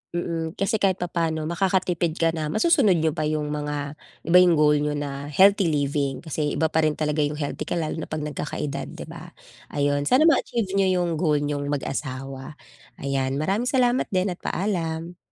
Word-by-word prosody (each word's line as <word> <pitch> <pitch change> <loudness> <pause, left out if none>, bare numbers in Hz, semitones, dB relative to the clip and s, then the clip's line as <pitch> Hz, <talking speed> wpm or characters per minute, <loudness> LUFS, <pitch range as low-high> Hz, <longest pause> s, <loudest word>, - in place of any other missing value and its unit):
Mhm, 165 -1 -3
kasi 210 +3 0
kahit 190 -2 +2
papa'no 165 -3 -2
makakatipid 175 -1 0
ka 165 -1 +2
na 155 -2 -3
masusunod 215 - +3
niyo 160 -1 +1
pa 155 -1 -2
yung 150 -1 -2
mga 145 -1 -3 0.3
iba 170 +3 +5
yung 180 -2 +5
goal 150 -1 +4
niyo 150 0 -1
na 145 -1 -4
healthy 195 +5 +5
living 140 -3 -1
kasi 150 -2 -2
iba 160 0 +1
pa 160 - +2
rin 150 - -1
talaga 150 0 -1
yung 145 0 +1
healthy 145 -2 -4
ka - - -1
lalo 160 -1 -2
na - - -5
pag 155 -1 -4
nagkakaedad, 150 -1 -4
'di - - -7
ba, - - -11 0.3
ayun 145 0 0
sana 265 +5 +5
ma-achieve 235 - +2
niyo 185 -2 +2
yung 165 -3 -2
goal 150 -4 +2
niyong 145 -1 -2
mag-asawa, 135 0 -4 0.5
ayan 135 -1 -1
maraming 195 - 0
salamat 250 -1 +2
din 185 0 0
at 175 - -7
paalam. 170 -3 -3
160 Hz, 185 wpm, -24 LUFS, 145-180 Hz, 0.5 s, iba